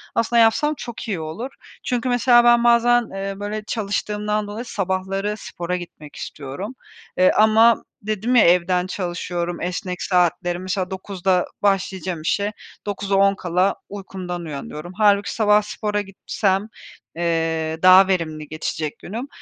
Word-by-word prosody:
Aslında, 230 +1 +2
yapsam 265 +7 +3
çok 235 -1 -7
iyi 195 -6 -2
olur. 160 +12 -5 0.3
Çünkü, 250 0 -1
mesela, 245 0 +5
ben 240 0 +5
bazen, 240 0 +4
eee, 195 0 -4
böyle 210 +1 -4
çalıştığımdan 210 0 -2
dolayı 215 +4 -6
sabahları 195 0 -2
spora 175 -3 -4
gitmek 155 -4 -11
istiyorum. 150 - -7 0.4
Eee, 185 0 +5
ama 220 +2 +5 0.2
dedim 215 +4 -1
ya, 235 - +7
evden 180 +1 +3
çalışıyorum, 175 -2 -3
esnek 180 +1 -4
saatleri, 175 -1 +1
mesela, 185 0 -3
09.00'da 190 -1 0 0.2
başlayacağım 190 -3 0
işe, 200 +6 0 0.3
08.50'de 195 -2 +1
uykumdan 185 -3 -6
uyanıyorum. 150 +3 -7
Hâlbuki 205 0 +3
sabah 210 -1 +4
spora 210 0 -2
gitsem, 195 0 -1 0.5
eee, 165 -1 -1
daha 185 +1 +8
verimli 160 -5 -2
geçecek 155 0 -4
günüm. 230 +8 -6
195 Hz, 125 wpm, -22 LUFS, 175-215 Hz, 0.5 s, daha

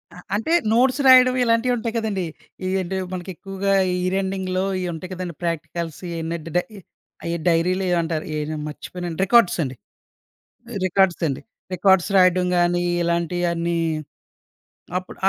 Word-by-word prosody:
ఆహ్, 180 - -12
అంటే 225 +10 -2 0.2
నోట్స్ 255 +3 +3
రాయడం 255 -1 +7
ఇలాంటియి 230 +1 +2
ఉంటాయి 225 0 -3
కదండీ. 210 -5 -1 0.4
ఎ - - 0
అంటే 190 +2 -3 0.2
మనకి 180 0 -5
ఎక్కువగా 195 +2 -2 0.2
ఈ - - 0
ఇయర్ 185 +1 0
ఎండింగ్‌లో 190 -1 -2 0.2
ఇయి 180 - -2
ఉంటాయి 180 +3 -8
కదండీ 180 -3 -5
ప్రాక్టికల్స్ 165 -1 -3
ఇయన్ని 165 0 -3
డ - - -5
డయ్ 180 -3 -6
డైరీ‌లో 180 +3 +2
ఏయో 175 - +2
అంటారు 160 -1 -3
ఏంటండి 150 0 -3
మర్చిపోయిన 175 +3 -6
రికార్డ్స్ 235 -2 +4
అండి. 130 -2 -5 1.1
రికార్డ్స్ 185 -1 +2
అండి. 135 - -3 0.3
రికార్డ్స్ 190 0 +4
రాయడం 185 -1 +4
గాని 175 0 +2 0.2
ఇలాంటియన్నీ 170 0 0 1.2
అప్పుడు 185 0 -7
180 Hz, 135 wpm, -22 LUFS, 170-195 Hz, 1.2 s, రాయడం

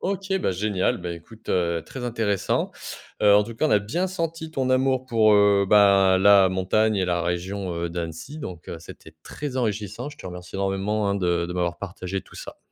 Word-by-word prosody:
OK, 195 0 -2
bah, - - 0
génial, 95 0 0
ben, 85 -1 -5
écoute, 105 +7 -15
heu, 85 -2 +1
très 130 - -8
intéressant. 110 -5 -1 0.5
Heu, 105 -1 +6
en 105 - +4
tout 115 +2 -8
cas, 155 +7 +1
on - - -2
a 105 - +5
bien 170 - -2
senti 165 -3 -4
ton 130 -4 -1
amour 130 0 +2
pour, 110 -4 +4
heu, 100 -1 +4
bah, 100 -2 +5
la 100 -1 +6
montagne 100 +4 +1
et 95 - +1
la 85 -1 0
région, 90 +2 -3
heu, 85 0 -3
d'Annecy 85 - -6
donc 90 - -8
heu, 85 - -6
c'était 80 -1 -13
très 145 -3 -6
enrichissant. 105 +1 -2
Je 145 - -12
te 95 - -10
remercie 90 +1 -8
énormément, 100 +2 -1
hein, 100 - +1
de 85 -3 0
de 90 - -5
m'avoir 85 -1 -2
partagé 95 0 -5
tout - - -19
ça. - - -9
100 Hz, 210 wpm, -24 LUFS, 90-115 Hz, 0.5 s, Heu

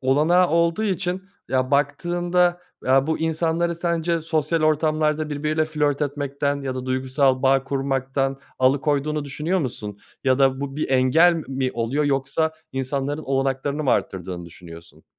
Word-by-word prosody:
olanağı 155 +7 +3
olduğu 170 +5 +2
için, 190 -1 -1 0.3
ya, 130 0 0
baktığında, 175 +5 +1 0.2
ya, 135 +2 +3
bu 160 - 0
insanları 165 +1 0
sence 170 -1 -1
sosyal 160 0 0
ortamlarda 155 0 +1
birbiriyle 155 +2 0
flört 150 -2 0
etmekten 140 0 -2
ya 130 -1 -3
da 130 0 -5
duygusal 130 0 +1
bağ 135 0 +3
kurmaktan 135 0 -1 0.2
alıkoyduğunu 145 +3 +1
düşünüyor 150 +7 -1
musun? 105 - -5 0.3
Ya 130 0 +3
da 135 -1 +3
bu 140 0 -5
bir 155 - -2
engel 135 +7 +5
mi 130 -1 -1
oluyor 120 +6 -1
yoksa 140 +3 0 0.2
insanların 135 +3 -2
olanaklarını 135 +2 -1
mı 130 - +2
artırdığını 90 -2 -2
düşünüyorsun? 85 -1 -13
145 Hz, 140 wpm, -23 LUFS, 135-160 Hz, 0.3 s, engel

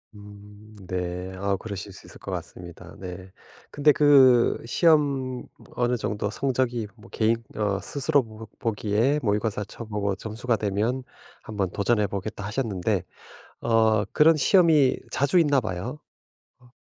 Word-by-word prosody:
음 105 +1 -14
네 90 0 -4
아 100 +1 -1
그러실 100 0 -7
수 95 - -13
있을 - - -14
것 - - -7
같습니다. 85 -2 -8
네 95 0 -8 0.4
근데 145 +1 +4
그 135 -5 +5
시험 140 -3 +2 0.3
어느 120 0 +1
정도 105 -1 -2
성적이 125 -2 -1
뭐 110 - -17
개인 115 +1 0
어 100 -2 0
스스로 140 0 +1
뭔가 110 -1 -11
보 120 - 0
보기에 110 +7 +1
모의고사 105 -1 -1
쳐보고 105 -4 -4
점수가 115 +4 -2
되면, 110 +6 -1 0.4
1 110 - -9
번 95 -3 0
도전해 105 0 +1
보겠다 100 +2 -5
하셨는데, 105 -4 -1 0.6
어 110 -2 +3
그런 160 +2 +5
시험이 155 -4 +4
자주 140 +6 +2
있나 145 -5 +3
봐요. 110 +7 -5 0.6
어. 125 - -21
110 Hz, 270 characters per minute, -25 LUFS, 100-130 Hz, 0.6 s, 그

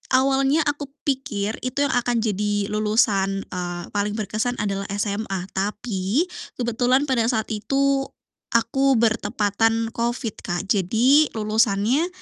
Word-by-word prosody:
awalnya 270 +3 +3
aku 290 -1 -2 0.2
pikir 225 -7 -2
itu 255 +3 -1
yang 285 - +1
akan 245 -1 +1
jadi 205 -1 -1
lulusan, 210 -2 +1
eee, 175 -1 -4
paling 205 0 -1
berkesan 220 +3 -2
adalah 195 -1 -2
SMA, 200 -2 -2
tapi 205 - -1 0.3
kebetulan 245 +3 +2
pada 240 -5 +1
saat 225 -3 -1
itu 275 +5 +1 0.5
aku 270 +3 +3
bertepatan 225 0 +1
COVID, 235 -1 -2
Kak, 175 -2 -2
jadi 235 - +4
lulusannya 220 - +2
225 Hz, 120 wpm, -23 LUFS, 205-255 Hz, 0.5 s, jadi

